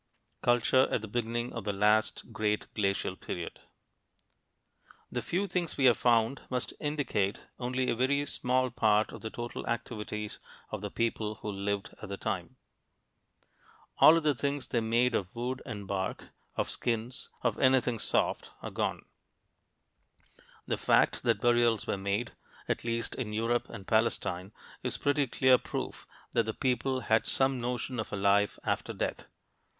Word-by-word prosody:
CULTURE 120 +2 +4
AT 110 - 0
THE - - -4
BEGINNING 120 +2 -2
OF 115 - -4
THE 105 0 -1
LAST 105 +3 +2
GREAT 105 -1 0
GLACIAL 100 -2 0
PERIOD 85 -1 -5 1.5
The - - -1
few 185 +4 0
things 175 -3 -2
we 135 - +3
have 120 -3 +6
found 120 +1 +3
must 125 -1 -2
indicate 145 -10 0 0.2
only 125 +1 -1
a - - +1
very 140 +4 +2
small 130 -1 0
part 110 -1 +3
of - - -9
the 110 - -4
total 120 +1 -5
activities 105 -2 -3 0.3
of 105 - -4
the 105 - -3
people 110 -1 -1
who 105 - -2
lived 100 0 -2
at 110 - -7
the 100 - -4
time. 100 +2 -3 1.4
All 160 - +9
of 165 - 0
the 150 -1 +4
things 140 +1 -2
they 120 - +2
made 120 +2 +2
of 95 -1 -2
wood 125 +2 -3
and 100 -1 -5
bark, 95 -1 -3 0.3
of - - 0
skins, 120 +2 -2
of - - +1
anything 130 -3 +3
soft, - - +1
are - - -4
gone. - - -2 1.6
The - - -1
fact - - +3
that - - +2
burials 120 -2 +3
were - - 0
made, 100 +4 -1 0.4
at - - -1
least 115 0 -1
in 110 -5 -4
Europe 115 +2 0
and 95 - -8
Palestine, 110 -4 +1 0.3
is - - -1
pretty 145 -1 +2
clear 130 +1 +5
proof - - -5 0.2
that 115 -2 +2
the 110 - -2
people 130 0 0
had 110 0 +2
some 135 -1 +2
notion 125 +1 -2
of 110 - -3
a - - -2
life 100 +1 +3
after - - -1
death. - - -3
115 Hz, 160 wpm, -30 LUFS, 105-125 Hz, 1.6 s, All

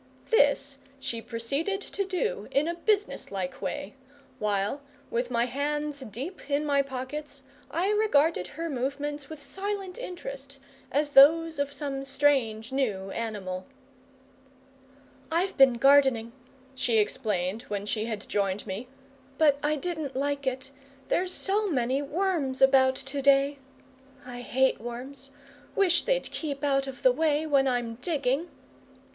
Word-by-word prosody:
This 280 -7 +3 0.2
she 230 -3 -4
proceeded 275 - -2
to 400 0 -3
do 405 +6 -2
in 285 +3 +1
a 340 - 0
businesslike 340 - -1
way, 200 - -4 0.5
while, 210 +6 0 0.3
with 240 +1 -1
my 235 -1 +2
hands 290 +3 -2
deep 270 - -7
in 290 +1 +1
my 285 -1 +3
pockets, 275 +2 -6 0.3
I 360 +6 0
regarded 330 - +3
her 330 - -5
movements 285 +1 -3
with 315 -2 -8
silent 390 - -4
interest, - - -7 0.3
as 290 0 +1
those 320 +3 +6
of 285 0 0
some 280 -2 -4
strange 270 -5 +1
new 205 -8 -1
animal. 200 -4 -4 1.6
"I've 355 +4 +1
been 270 -2 +7
gardening," 265 -2 +4 0.4
she 250 -3 +1
explained, 210 -3 0
when 205 -1 -3
she 215 +1 -1
had 220 -3 -4
joined 200 -1 -1
me, 200 +7 -5 0.5
"but 290 -3 +4
I 300 +1 +1
didn't 310 -4 -4
like 280 0 -1
it. 260 +1 -2 0.4
There's 365 +1 +1
so 405 +3 0
many 260 -2 +1
worms 295 -3 -1
about 265 -1 +5
to 270 +1 -4
day. 275 +1 +4 0.7
I 245 -1 -7
hate 265 -1 +1
worms. 260 +3 -7 0.5
Wish 360 -3 +3
they'd - - 0
keep 285 -3 -4
out 275 -1 +2
of 265 -1 -8
the 255 - +7
way 305 +2 +1
when 280 -3 +3
I'm 240 -2 -1
digging." 290 +1 0
275 Hz, 135 wpm, -28 LUFS, 245-310 Hz, 1.6 s, been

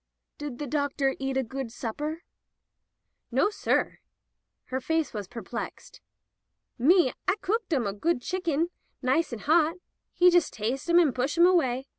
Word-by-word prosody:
"Did 290 -4 -5
the 295 - -4
doctor 280 -1 0
eat 270 0 -2
a 265 - +2
good 260 0 -5
supper?" 295 +9 -4 1.1
"Nossir." 415 0 +1 0.7
Her 260 +1 -3
face 320 +1 0
was 205 -4 -5
perplexed. 230 +2 -7 0.8
"Me, 320 +1 +5
I 375 - +3
cooked 440 -1 -1
'em 265 -7 +1
a 200 - -1
good 245 +4 0
shicken, 345 -2 -1 0.3
nice 265 +6 +2
and 230 -3 -6
hot. 320 +1 +3 0.4
He 360 0 +6
jus' 345 -3 +4
tas'e 245 +8 -3
'em 340 - +5
and 320 -7 +5
push 265 +6 -1
'em 340 - +7
away. 270 -8 +2
290 Hz, 150 wpm, -27 LUFS, 255-340 Hz, 1.1 s, em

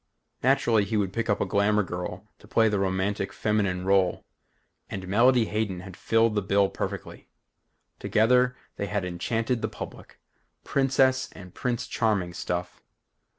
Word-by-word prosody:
Naturally 120 -4 +3
he 110 +2 -1
would 95 -2 0
pick 115 +1 -2
a 105 - +4
glamour 105 +1 +2
girl 90 -1 -5
to - - -17
play 115 -1 +3
the 105 -2 +1
romantic 95 +1 -1
feminine 100 -4 0
role 95 -2 +2 0.6
and 95 -1 -6
Melody 120 +4 +4
Hayden 105 -4 -2
had 95 -1 -10
filled 115 +2 +2
the 105 - +1
bill 100 0 +2
perfectly. - - -6 0.7
Together, 125 +3 +3 0.2
they 100 - -2
had 100 -2 -2
enchanted 115 +7 -1
the 110 - 0
public. 110 - -10 0.4
Princess 130 -1 +2
and 90 -2 -12
Prince 120 -2 -2
Charming 100 -6 0
stuff. 90 0 -4
105 Hz, 145 wpm, -26 LUFS, 95-115 Hz, 0.7 s, a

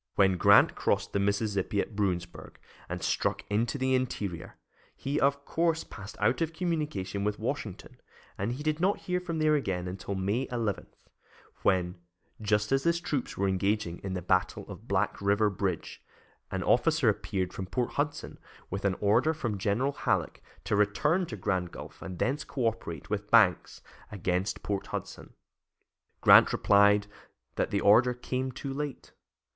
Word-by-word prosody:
When 95 -2 +4
Grant - - +6
crossed - - -1
the 100 - +1
Mississippi 100 0 0
at 105 - -3
Bruinsburg 95 -4 -3 0.3
and - - -4
struck - - 0
into 115 +6 0
the 130 -1 +1
interior, 105 -9 -2 0.4
he, 140 +2 -2
of 140 +1 +1
course, 165 -1 0
passed 100 0 -10
out 115 +9 +2
of 165 0 0
communication 150 - -2
with 105 0 -1
Washington, - - -5 0.3
and 100 +5 -2
he 140 +4 -6
did 155 0 0
not 190 +4 +1
hear 180 -1 -1
from 175 -2 -4
there 155 -1 +3
again 95 -11 -1
until 95 +2 -5
May 100 +7 -1
11, 115 -5 -2 0.7
when, 90 -1 +1 0.4
just 105 +1 +1
as 135 0 +3
his 170 +2 +1
troops 145 -6 -3
were 100 - +1
engaging 95 -1 0
in 95 -1 -4
the 90 - -4
battle 95 +1 0
of - - -10
Black - - 0
River 100 +1 +2
Bridge, 95 -3 -3 0.5
an 95 -1 -3
officer 155 - +3
appeared 100 -3 0
from 95 - -5
Port 125 +5 -1
Hudson 145 0 -3 0.3
with 100 +2 -3
an 95 -2 +2
order 115 +10 +3
from 120 -10 -3
General 110 +8 +1
Halleck - - -1 0.2
to - - 0
return 150 - +2
to 115 - -6
Grand 90 -2 -1
Gulf - - -10
and 95 -2 -7
thence 135 - 0
cooperate 115 - -3
with 105 0 -2
Banks 105 -6 +3 0.3
against 95 -1 -2
Port 100 -1 -2
Hudson. - - -7 0.9
Grant - - +8
replied 100 0 +4 0.5
that - - -1
the 100 - 0
order 120 +4 +5
came 130 +1 -3
too 135 +2 -6
late. 145 -1 -5
105 Hz, 160 wpm, -29 LUFS, 95-135 Hz, 0.9 s, Grant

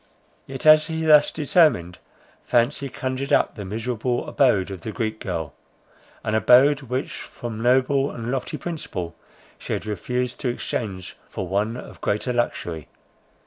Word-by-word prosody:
Yet, 135 0 -6
as 155 0 +7
he 160 0 -3
thus 150 -2 +6
determined, 140 - +2 0.4
fancy 130 +3 +1
conjured 130 +1 -4
up - - +3
the 105 - -7
miserable 115 +4 -2
abode 100 -8 +2
of 95 -3 -7
the 110 - -5
Greek 110 -1 -3
girl. 85 - -4 0.7
An 110 - -2
abode, 130 +6 +5
which 130 0 -3
from 115 -2 -7
noble 130 +3 +3
and 115 0 -5
lofty 135 -1 -3
principle, 150 - -5 0.4
she - - -4
had - - -3
refused 125 +5 -2
to 130 - -1
exchange 100 -6 -4
for 95 - -5
one 105 +5 -1
of - - -11
greater 105 +5 -1
luxury. 85 -9 -2
120 Hz, 145 wpm, -23 LUFS, 105-135 Hz, 0.7 s, as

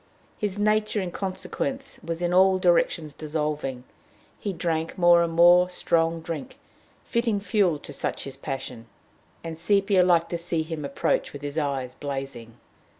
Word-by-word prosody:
His 205 -2 -2
nature, 215 +1 +1
in 185 -3 -3
consequence, 265 +9 -4
was 165 +1 -4
in 175 0 0
all 190 +1 +5
directions 170 -4 +2
dissolving. 150 -4 -3 0.6
He 205 - -3
drank 165 -2 -2
more 175 -1 +6
and 170 -1 0
more 175 +2 +6
strong 165 -2 0
drink, 160 -4 -6 0.5
fitting 235 -3 0
fuel 195 -4 +1
to 145 - -10
such - - -3
his 135 - -6
passion, 125 -4 -6 0.6
and 165 -1 -6
Sepia 195 +2 +3
liked 175 -2 +3
to 170 - -2
see 170 -1 -1
him 155 -1 -5
approach 140 0 -1
with 145 0 -9
his 145 +2 -2
eyes 135 -4 -2
blazing. 135 -5 -6
165 Hz, 150 wpm, -25 LUFS, 150-185 Hz, 0.6 s, more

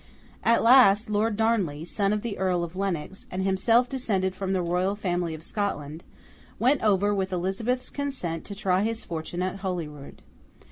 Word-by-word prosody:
At 230 - +3
last, 230 -3 +6
Lord 210 +1 +1
Darnley, 200 -9 0
son 200 +3 0
of 210 0 -1
the 230 -4 -3
Earl 180 -2 +1
of 170 +1 -6
Lennox, 190 -1 -3
and 185 +1 -3
himself 225 +6 +3
descended 195 -8 -1
from 190 0 -3
the 185 -2 +1
Royal 180 +3 0
Family 175 -5 -2
of 160 - -11
Scotland, 165 -6 -3 0.5
went 255 +5 +3
over 205 -1 +3
with 190 -1 -1
Elizabeth's 195 +8 -1
consent 260 - -3
to 200 - -7
try 190 -1 +1
his 225 +2 -2
fortune 170 +2 -4
at 185 +1 -2
Holyrood. 165 -7 -6
195 Hz, 170 wpm, -26 LUFS, 175-220 Hz, 0.5 s, last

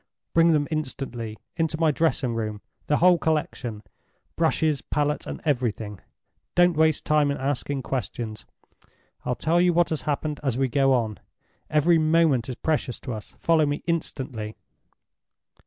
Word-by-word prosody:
"Bring 165 0 +5
them 150 -2 +2
instantly 130 -7 -4 0.2
into 160 -1 0
my 160 -2 +4
dressing 145 -5 +1
room—the 110 +6 -3
whole 180 0 +5
collection, 130 -8 -2 0.5
brushes, 160 -3 +1
palette, 150 0 -1
and - - -5
everything. 115 -7 -1 0.6
Don't 175 -1 +5
waste 155 -1 +2
time 150 -1 +3
in 140 - -1
asking 135 0 -2
questions; 120 -4 -4 0.8
I'll 125 - 0
tell 165 +7 +2
you 180 -1 +4
what 175 0 +2
has 160 - -1
happened 150 0 -2
as 135 -5 -1
we 135 -1 +1
go 135 +2 +3
on. 110 -4 0 0.5
Every 160 +2 +4
moment 155 -6 +3
is 125 - -3
precious 150 -5 -1
to 125 - -5
us. 105 -1 -8
Follow 160 -2 +3
me 145 +1 -2
instantly!" 130 -9 -3
145 Hz, 145 wpm, -25 LUFS, 125-160 Hz, 0.8 s, Bring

